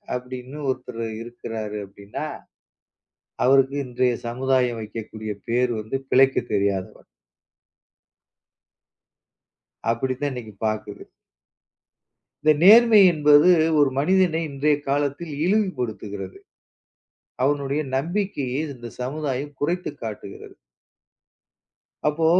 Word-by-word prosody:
அப்டின்னு 125 +2 -7
ஒருத்தர் 125 -2 -4 0.2
இருக்குராறு. 110 -3 -6
அப்டின்னா, 100 +1 -7 1.2
அவருக்கு 135 +1 +4
இன்றைய 125 0 0
சமுதாயம் 125 -1 0
வைக்கக்கூடிய 110 0 -6
பெயர் 120 +1 +1
வந்து 110 +5 -5 0.2
பிழைக்கத் 135 +1 +4
தெரியாதவன். 100 -2 -1 2.9
அப்டி 130 +3 -1
தான் 145 -1 0
இன்னைக்கு 110 -4 -8
பாக்குது. 105 -1 -3 1.4
இந்த 155 - +6
நேர்மை 225 +2 +8
என்பது 150 +1 +5 0.3
ஒரு 140 -2 +5
மனிதனை 175 0 +2
இன்றைய 145 +2 +1
காலத்தில் 145 +3 -1
இழிவுபடுத்துகிறது. 120 - -2 1.1
அவனுடைய 140 +1 0 0.2
நம்பிக்கையை 150 -4 -2
இந்தச் 120 -1 -11
சமுதாயம் 145 +1 -3
குறைத்துக் 170 -1 -2
காட்டுகிறது. 105 -2 -8 1.5
அப்போ 160 +2 +1
130 Hz, 85 wpm, -23 LUFS, 115-150 Hz, 2.9 s, நேர்மை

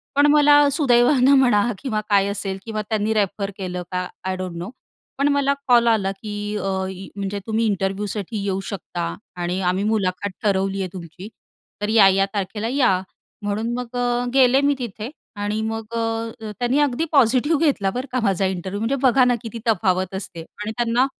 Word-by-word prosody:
पण 285 +1 +5
मला 295 -1 +6
सुदैवानं 265 -1 +4
म्हणा 230 -6 +4 0.2
किंवा 220 -6 -2
काय 200 -1 +4
असेल 200 -1 -3
किंवा 215 -2 -3
त्यांनी 220 0 0
रेफर 200 -1 -1
केलं 180 -2 -4
का 180 0 -1 0.2
आय 190 0 -1
डोंट 185 -2 -5
नो. 175 +4 -5 0.5
पण 280 +1 +2
मला 280 0 +2
कॉल 240 -2 +5
आला 210 -4 +2
की 210 -2 -5 0.2
अ, 195 -1 -2 0.2
य 190 0 -8
म्हणजे, 200 0 -3
"तुम्ही 225 +1 +1
इंटरव्ह्यूसाठी 200 +1 -2
येऊ 195 -1 -1
शकता 85 - -4 0.2
आणि 175 +1 -2
आम्ही 190 +2 -1
मुलाखत 195 0 -1
ठरवली 195 -1 +1
आहे 185 - -3
तुमची. 180 +2 -9 0.5
तर 210 - -1
या-या 195 -3 +5
तारखेला 210 +2 -3
या." 245 -8 +2 0.4
म्हणून 210 +3 -2
मग 250 0 -6
अ, 245 0 +1
गेले 265 0 +5
मी 285 0 +3
तिथे 225 -1 -5 0.3
आणि 205 +1 -2
मग 225 0 -3
अ, - - 0 0.4
अ, 215 -1 -5
त्यांनी 245 +3 +1
अगदी 290 +1 +1
पॉझिटिव्ह 275 +2 +3
घेतला 215 -10 +2
बरं 250 +6 -4
का 255 - 0
माझा 195 -2 +1
इंटरव्ह्यू. 190 +1 -3
म्हणजे 225 +5 0
बघा 260 0 +5
ना 245 -1 +3
किती 230 0 -7
तफावत 185 -3 +1
असते 190 -3 -6
आणि 210 +6 -7
त्यांना 240 +1 +2
210 Hz, 180 wpm, -22 LUFS, 195-245 Hz, 0.5 s, मला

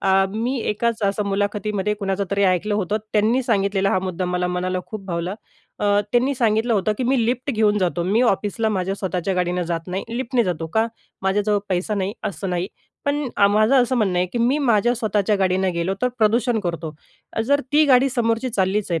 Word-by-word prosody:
अ, 195 - +1 0.2
मी 245 +4 -1
एकाच 230 +1 -1
असं 200 +1 0
मुलाखतीमध्ये 205 0 -1
कुणाचं 200 -1 -2
तरी 200 0 +1
ऐकलं 190 +3 +1
होतं. 210 +1 0 0.2
त्यांनी 220 +5 +2
सांगितलेला 200 -4 +1
हा 185 - +2
मुद्दा 185 -1 -3
मला 180 0 -1
मनाला 180 +1 -1
खूप 215 -3 -7
भावला. 175 +2 -3 0.4
अ, 210 - -2 0.3
त्यांनी 255 +3 +2
सांगितलं 230 0 +1
होतं 205 +1 +1
की 255 - -1
मी 250 -2 +2
लिफ्ट 250 +4 -1
घेऊन 215 -3 +2
जातो. 175 -2 0
मी 230 - +3
ऑफिसला 220 0 +1
माझ्या 195 -2 -1
स्वतःच्या 190 -1 -2
गाडीनं 180 0 0
जात 165 +1 -4
नाही. 185 +2 -3
लिफ्टने 245 -2 0
जातो. 170 -3 -2
का? 220 +1 +3 0.4
माझ्याजवळ 205 +2 +1
पैसा 190 +3 -1
नाही 195 0 -1 0.2
असं 190 0 -5
नाही. 180 +1 -1 0.4
पण 285 -1 0
आ 200 - +5
माझं 215 +5 +3
असं 255 +1 0
म्हणणं 195 -6 +1
आहे 180 - +2
की 240 - -2
मी 245 +5 +2
माझ्या 240 -3 +2
स्वतःच्या 210 -3 0
गाडीनं 190 0 +1
गेलो 170 +3 -1
तर 250 - +3
प्रदूषण 230 +1 +2
करतो. 170 -4 -4 0.4
अ - - -2
जर 285 +5 +2
ती 305 +1 +5
गाडी 265 0 +5
समोरची 230 0 0
चाललीच 195 -1 0
आहे, 165 -1 0
205 Hz, 200 wpm, -22 LUFS, 185-230 Hz, 0.4 s, आ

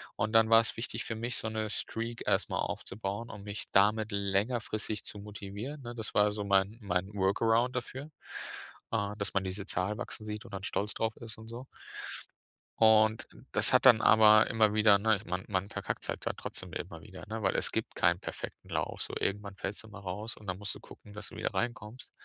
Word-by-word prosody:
und 105 +2 -1
dann 110 0 +6
war 115 0 +8
's - - -2
wichtig 115 0 -3
für 115 - -4
mich, 115 +2 -2
so 110 - -1
'ne 110 -1 -2
Streak 115 +2 -2
erst - - +1
mal - - -1
aufzubauen 100 +3 -3
und 105 -3 -9
mich 105 0 -5
damit 105 +2 +4
längerfristig 105 +1 -1
zu 105 - -6
motivieren, 105 +7 -7
ne? 120 -1 -7
Das 110 -2 -4
war 105 0 +4
so 105 -1 -3
mein 100 +2 +2
mein 95 0 -1
Workaround 115 +5 +2
dafür, 130 +4 -5 0.8
äh, 105 -2 0
dass 100 - 0
man 95 - +1
diese 95 +1 -3
Zahl 100 +2 0
wachsen 115 -2 -5
sieht 105 +2 -5
und 115 - -13
dann 95 -1 -5
stolz 105 +2 0
drauf 110 -1 -1
ist 115 -1 -7
und 110 0 -11
so. 120 +3 -8 1.1
Und, 110 0 +5 0.2
das - - +4
hat - - +5
dann 120 -4 +8
aber 110 -1 +7
immer 110 -2 +3
wieder, 105 -2 +6
ne, 110 +2 +3
ich 100 - -8
man 90 +1 -3
man 100 0 -1
verkackt's - - -4
halt - - -3
da - - 0
trotzdem 90 -3 -6
immer 85 -2 -6
wieder, 95 0 -11
ne, 110 +1 -4
weil 95 - +2
es - - +2
gibt - - -3
keinen - - +3
perfekten - - -7
Lauf. - - -2
So, - - -6
irgendwann 100 0 -2
fällst 95 +3 -4
du - - -13
mal 105 -1 -10
raus 105 +5 -5
und 105 - -14
dann 95 0 -2
musst 105 -1 -3
du - - -10
gucken, 105 - -14
dass 105 -1 -7
du - - -12
wieder - - -2
reinkommst. 120 0 -4
105 Hz, 215 wpm, -31 LUFS, 100-110 Hz, 1.1 s, war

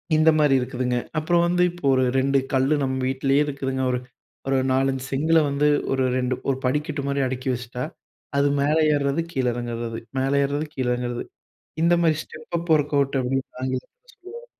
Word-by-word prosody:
இந்த 155 +1 +5
மாரி 150 -2 +4
இருக்குதுங்க. 125 0 -1 0.2
அப்புறம் 170 +2 +2
வந்து 180 +1 +1
இப்போ 175 -3 -9
ஒரு 130 - +3
2 135 +1 +2 0.2
கல்லு 135 +3 +3
நம்ம 130 -1 -1
வீட்லே 135 +1 +1
இருக்குதுங்க 135 -2 -3
ஒரு 125 - 0 0.5
ஒரு 135 0 +2
4 135 +1 +2
5 130 -1 -4
செங்கல்ல 160 +4 +3
வந்து 140 +1 0 0.3
ஒரு 135 -1 +1
2 125 0 0 0.2
ஒரு 135 - +1
படிக்கட்டு 150 +2 -1
மாரி 140 0 -1
அடிக்கி 130 0 -4
வச்சுட்டா. 125 0 -5 0.5
அது 140 0 +4
மேல 145 +3 +2 0.2
ஏறது, 140 +2 0
கீழ 130 -5 -1
இறங்கறது, 120 -1 -4 0.2
மேல 135 +1 +1
ஏறது, 145 +2 -1
கீழ 130 -4 -2
இறங்கறது. 120 0 -3 0.6
இந்த 170 +1 +4
மாரி 160 -2 +3
ஸ்டெப் 155 +2 -9
அப் 170 0 -6
ஒர்க் 150 -1 0
அவுட் 140 0 +1
அப்டின்னு 130 +1 -1 0.2
ஆங்கிலத்தில 130 - -5
சொல்லுவாங்க. 460 +3 -11
135 Hz, 175 wpm, -23 LUFS, 130-155 Hz, 0.6 s, இந்த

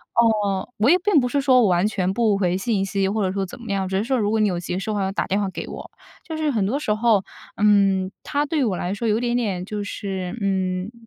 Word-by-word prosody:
哦， 210 -5 +2
我 220 +5 +3
也 350 - +6
并 385 -4 +3
不 250 - 0
是 285 - +1
说 260 -2 +4
我 225 - +4
完 180 +2 +2
全 190 -3 -1
不 215 -1 +2
回 180 -2 +1
信 195 -1 0
息 195 0 0
或 210 +2 -1
者 185 - 0
说 195 0 -2
怎 190 - -11
么 230 -3 -6
样， 195 -1 -1
只 190 0 -1
是 200 - 0
说 260 +3 0
如 210 -3 0
果 220 - +1
你 210 -1 +3
有 175 -2 -2
急 175 +1 -4
事 195 - -5
的 - - -2
话， 200 - 0
要 190 - -1
打 195 - -1
电 195 - 0
话 205 - 0
给 190 - -6
我。 - - -9 0.4
就 320 - -4
是 310 -1 0
很 215 -6 0
多 250 +9 -1
时 215 -8 0
候， 215 -2 +2 0.3
嗯， 195 -2 +3
它 290 +1 -1
对 295 -2 0
我 200 -5 0
来 180 +2 -2
说 225 +3 -3
有 215 0 +2
一 - - -5
点 240 -1 0
点 200 -7 -2
就 205 +1 -4
是， 195 -1 -5
嗯， 190 0 -1
205 Hz, 305 characters per minute, -22 LUFS, 190-235 Hz, 0.4 s, 也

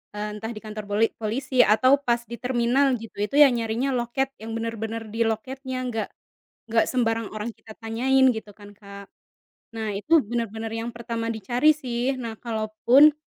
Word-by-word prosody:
eee, 210 0 -3
entah 225 +2 -5
di 215 - -8
kantor 215 -1 -6
poli 210 +2 +3
polisi 250 +4 -2
atau 260 +5 +4
pas 235 0 +2
di 235 - -4
terminal 255 +2 +2
gitu 225 - -11
itu 210 +7 -2
yang 275 - +6
nyarinya 230 +4 -1
loket 250 +3 -1
yang 225 +1 -6
bener-bener 225 0 -4
di 225 - -6
loketnya, 260 +4 -4
enggak 225 -4 -2 0.6
enggak 225 0 +4
sembarang 225 -3 +1
orang 215 +2 -3
kita 220 0 -14
tanyain 260 +4 +3
gitu 220 -3 -5
kan 205 -1 -13
Kak, 200 -1 -11 0.6
nah 220 -1 -4
itu 310 +10 +4
bener-bener 225 -1 -3
yang 235 - -4
pertama 230 -1 -3
dicari 240 +8 +2
sih 260 -2 -2
nah 230 -2 -5
kalaupun 235 +6 +4
230 Hz, 165 wpm, -25 LUFS, 220-255 Hz, 0.6 s, yang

